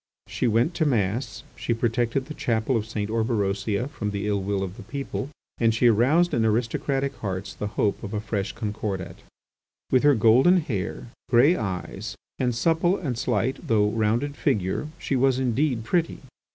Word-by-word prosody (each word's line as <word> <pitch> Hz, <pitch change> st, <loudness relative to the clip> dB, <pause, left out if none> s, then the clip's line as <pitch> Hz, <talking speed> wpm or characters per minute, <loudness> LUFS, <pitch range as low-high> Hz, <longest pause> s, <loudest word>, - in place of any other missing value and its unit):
She 125 Hz, -, -1 dB
went 115 Hz, +9 st, +2 dB
to 165 Hz, -2 st, 0 dB
Mass; 115 Hz, -1 st, -1 dB
she 115 Hz, -, -1 dB
protected 120 Hz, +3 st, 0 dB
the 155 Hz, -, -7 dB
chapel 115 Hz, -1 st, 0 dB
of 110 Hz, -1 st, -1 dB
St. 105 Hz, -2 st, -3 dB
Orberosia 110 Hz, -1 st, 0 dB
from 115 Hz, -8 st, -4 dB
the 100 Hz, 0 st, -3 dB
ill 100 Hz, -1 st, 0 dB
will 100 Hz, 0 st, -1 dB
of 95 Hz, 0 st, -5 dB
the -, -, -8 dB
people; 140 Hz, 0 st, -5 dB, 0.3 s
and 115 Hz, -1 st, +3 dB
she 120 Hz, -, +2 dB
aroused 130 Hz, +10 st, +4 dB
in 115 Hz, -, +2 dB
aristocratic 125 Hz, +5 st, 0 dB
hearts 95 Hz, -2 st, -4 dB
the 105 Hz, -, -4 dB
hope 100 Hz, -, +1 dB
of 100 Hz, -, -6 dB
a 105 Hz, -, -2 dB
fresh 100 Hz, -2 st, -2 dB
Concordat. 105 Hz, -4 st, -4 dB, 0.7 s
With 130 Hz, -, +5 dB
her 145 Hz, -1 st, +5 dB
golden 125 Hz, -, +5 dB
hair, 100 Hz, -, -4 dB, 0.2 s
grey 135 Hz, +8 st, +5 dB
eyes, 95 Hz, -5 st, -4 dB, 0.2 s
and 125 Hz, -2 st, 0 dB
supple 165 Hz, +8 st, +2 dB
and 135 Hz, -9 st, -3 dB
slight 120 Hz, +1 st, -1 dB
though 105 Hz, -2 st, +3 dB
rounded 115 Hz, +6 st, 0 dB
figure, 105 Hz, -2 st, 0 dB
she 140 Hz, -, -2 dB
was 130 Hz, 0 st, +3 dB
indeed 130 Hz, -1 st, 0 dB
pretty. 165 Hz, +8 st, 0 dB
115 Hz, 170 wpm, -25 LUFS, 105-135 Hz, 0.7 s, With